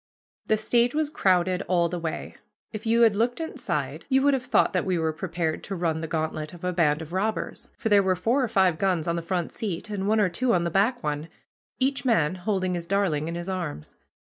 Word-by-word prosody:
The 215 - +3
stage 240 +4 +2
was 305 -1 0
crowded 185 - +2
all 175 -2 +3
the 175 +1 -4
way. 165 -1 -4 0.4
If 215 +1 -6
you 230 +1 +3
had 220 -3 +5
looked 240 +6 0
inside 325 0 -3
you 265 0 +3
would 285 0 +4
have 255 -2 -1
thought - - +3
that 180 - +1
we 185 -2 0
were 160 -1 0
prepared 165 -1 -3
to 195 - -4
run 165 -3 -1
the 160 - -3
gantlet 155 0 -3
of 175 - -15
a 180 0 -1
band 160 -3 +2
of 160 +2 -11
robbers, 215 +4 -2
for - - -2
there 205 -1 +6
were 190 -1 +2
four 235 +9 +1
or - - +1
five 190 -6 +2
guns 180 -5 +1
on 170 - +1
the 170 - -2
front 175 0 -2
seat 210 -1 -4
and 195 -1 -2
one 220 +1 +3
or 205 - +4
two 235 +6 +1
on 175 - +1
the 170 - -1
back 220 +7 +1
one, 150 +1 -2 0.5
each 270 +1 0
man 195 - +2
holding 185 0 -1
his 170 -1 -4
darling 180 -6 +1
in 170 - -4
his 175 +1 -5
arms. 175 - -4
185 Hz, 235 wpm, -26 LUFS, 170-220 Hz, 0.5 s, there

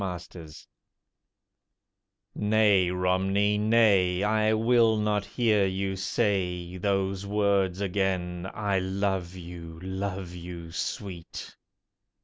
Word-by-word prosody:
ROMNEY 90 -4 -7 1.8
Nay, 105 -3 +3
Romney, 95 +3 +1
nay—I 105 -1 +3
will 115 0 +3
not 105 -1 0
hear 110 -5 +2
you 95 +1 -2
say 95 -3 -1
Those 95 0 -1
words 100 -3 +1
again: 95 -2 -1
"I 100 -2 0
love 95 -1 -2
you, 85 -2 -9
love 95 -1 -4
you 85 -1 -8
sweet!" 85 +1 -6
95 Hz, 90 wpm, -27 LUFS, 90-105 Hz, 1.8 s, Nay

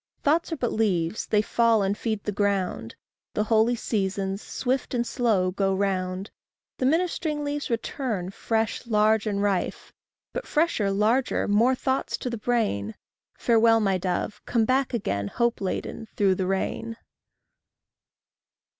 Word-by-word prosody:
Thoughts 325 +4 +2
are - - 0
but 240 -3 -1
leaves; 190 -4 0
they 210 -1 +2
fall 230 -1 +3
and 195 +1 0
feed 215 -1 -3
the 210 - -2
ground. 195 - -1 0.4
The 210 - +2
holy 225 +2 +3
seasons, 195 -3 -2
swift 260 0 -2
and 240 0 +1
slow, 215 -8 +1
go 195 0 0
round; 190 0 -1 0.5
The 255 - +2
ministering 315 -1 0
leaves 290 0 -3
return, 225 -5 -2
fresh, 225 +3 -1
large, 215 0 +3
and 200 -1 0
rife 200 -3 -1 0.4
But - - -4
fresher, 300 -10 +1
larger, 220 +6 +1
more 230 +6 +4
thoughts 265 +1 -1
to 250 - -4
the 235 - -3
brain: 210 - 0 0.4
Farewell, 230 -1 +4
my 195 -3 +1
dove! 185 +3 -2
come 230 -2 +2
back, 260 +2 +1 0.4
hope 235 -2 +1
laden, 195 +3 -3
through 195 -2 +3
the 185 0 -2
rain. 225 +4 -2
220 Hz, 140 wpm, -26 LUFS, 195-240 Hz, 0.5 s, more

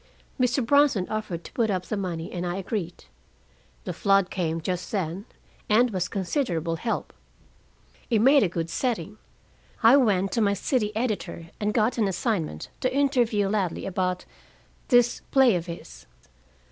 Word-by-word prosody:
"Mr. 250 0 +2
Bronson 280 -7 +3
offered 210 -6 -3
to - - -11
put 230 -3 +1
up 185 -2 -1
the - - -3
money, 175 -5 -4
and 175 - -4
I 175 0 -2
agreed. 195 -3 -4 0.8
The - - -4
flood 195 -3 +2
came 165 -3 -1
just 180 +2 -4
then, 190 0 -2 0.4
and 235 +3 +4
was 185 -3 -1
considerable 175 - -1
help. 225 +6 -3 1.0
It 230 - +3
made 270 +6 +6
a 195 - +2
good 165 -1 -3
setting. 210 -4 -2 0.6
I 235 +5 +8
went 195 -7 +2
to 230 - 0
my 200 -1 +2
city 210 +1 0
editor, 205 -8 -3
and 210 0 0
got 225 +2 +1
an 210 - +3
assignment 180 - -2
to 255 - 0
interview 250 -7 +2
Ladley 195 -4 -1
about 185 -1 -2 0.6
this 245 -1 +3
play 265 -4 +5
of 170 0 -3
his. 170 0 -9
200 Hz, 155 wpm, -26 LUFS, 180-235 Hz, 1.0 s, I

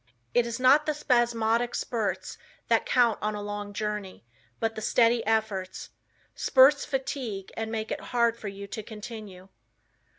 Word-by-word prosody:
It 240 -1 +3
is 235 +1 -4
not 275 +4 +5
the 305 - +1
spasmodic 240 -3 +1
spurts 225 -4 -3 0.3
that - - +3
count 240 -3 +3
on 215 0 -1
a 205 - -5
long 205 0 -5
journey, 210 - -4 0.3
but 225 0 0
the 220 - -6
steady 230 +1 +3
efforts. 210 -4 -1 0.4
Spurts 275 +2 +5
fatigue 255 -7 -4
and 225 0 -3
make 220 -1 -3
it - - -3
hard 235 -1 +2
for 220 - -8
you 200 0 -7
to 200 +2 -6
continue. 210 -3 -9
225 Hz, 155 wpm, -27 LUFS, 205-240 Hz, 0.4 s, not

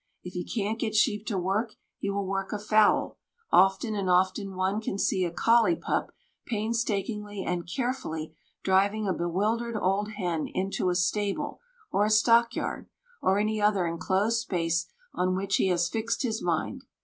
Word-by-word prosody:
If 180 - -8
he 180 - -3
can't 220 0 -2
get 220 -2 -2
sheep 215 -1 +2
to 205 - -1
work, 200 +5 -1 0.2
he 200 - -2
will 200 0 -1
work 195 0 -2
a 210 - -1
fowl; 215 +1 +2 0.3
often 195 +4 +4
and 195 -3 -1
often 190 +2 +1
one 190 +3 0
can 200 - -3
see 190 -1 +1
a 175 - 0
collie 230 - +3
pup - - -2 0.4
painstakingly 210 -2 -2
and 175 -1 -2
carefully 170 - -3 0.3
driving 200 +3 +2
a 190 - +2
bewildered 215 +7 -1
old 200 +3 0
hen 175 -6 -2
into 190 -1 -1
a 180 - 0
stable, 200 +3 -1 0.3
or 200 - +2
a - - +1
stock 230 +2 +4
yard, - - -4 0.3
or 190 +1 +3
any 215 +1 0
other 205 -3 +3
enclosed 190 +7 0
space 170 -6 -1 0.3
on 185 0 0
which 195 +1 0
he - - +2
has 175 -2 +2
fixed 225 +5 -2
his 225 -3 -1
mind. 180 +10 -1
200 Hz, 170 wpm, -28 LUFS, 185-220 Hz, 0.4 s, often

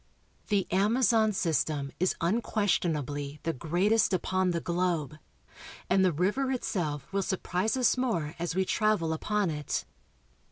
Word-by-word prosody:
The 200 -3 +1
Amazon 220 +3 +3
system 155 -6 -1
is 185 +1 +1
unquestionably 165 - -1
the 165 - -1
greatest 185 - +1
upon 185 0 +1
the 170 -1 0
globe, 170 -4 -1 0.7
and 190 - +4
the 185 - +4
river 205 - 0
itself 160 - -3
will 200 - +1
surprise 190 +3 -1
us 250 -2 +3
more 175 -13 -1
as 170 0 -2
we 190 0 +2
travel 210 -7 +1
upon 205 +2 0
it. 150 -2 -3
185 Hz, 130 wpm, -29 LUFS, 160-210 Hz, 0.7 s, and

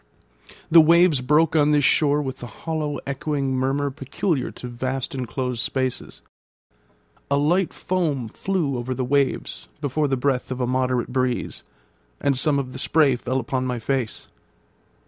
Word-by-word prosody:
The 165 0 +9
waves 165 -2 +5
broke 150 +4 +3
on 150 -1 +4
this 150 -1 +3
shore 145 +1 +3
with 130 -1 -4
the 120 - -8
hollow 155 0 -3
echoing 140 -1 -2
murmur 135 +2 0
peculiar 140 +2 -2
to 125 - -9
vast 130 +2 -3
inclosed 125 -1 -3
spaces. 130 +1 -3 1.1
A 140 - +2
light 170 +6 +2
foam 155 -10 -1
flew 150 - -2
over 130 +2 -3
the 130 - -2
waves 140 0 -1
before 145 +1 0
the 135 -1 0
breath 130 0 0
of 130 -1 -4
a 125 - +1
moderate 125 -1 0
breeze, 130 -2 -1 0.6
and 140 - +1
some 140 +2 +2
of 130 -2 -3
the 130 - -7
spray 145 -2 +3
fell 130 +2 -2
upon 130 +1 -2
my 125 -1 -2
face. 125 0 -2
135 Hz, 155 wpm, -23 LUFS, 130-150 Hz, 1.1 s, The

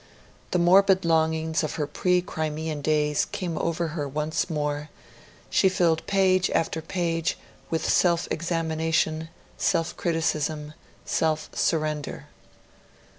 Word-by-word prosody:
The - - +1
morbid 190 +1 +5
longings 160 -1 +1
of 155 - -3
her 150 - -1
pre 180 +4 +1
Crimean 155 -3 -3
days 150 0 +1
came 175 -3 -4
over 170 0 -1
her 150 -2 -3
once 150 +5 -2
more; 150 -1 -2 0.6
she 190 - +4
filled 170 -3 +1
page 185 -2 +3
after 160 0 0
page 165 -1 -1 0.3
with 160 -1 -1
self 170 -2 +3
examination, 160 -1 0 0.3
self 165 - +1
criticism, 155 -2 -1 0.3
self 155 -1 0
surrender. 155 -3 -1
160 Hz, 115 wpm, -26 LUFS, 155-170 Hz, 0.6 s, morbid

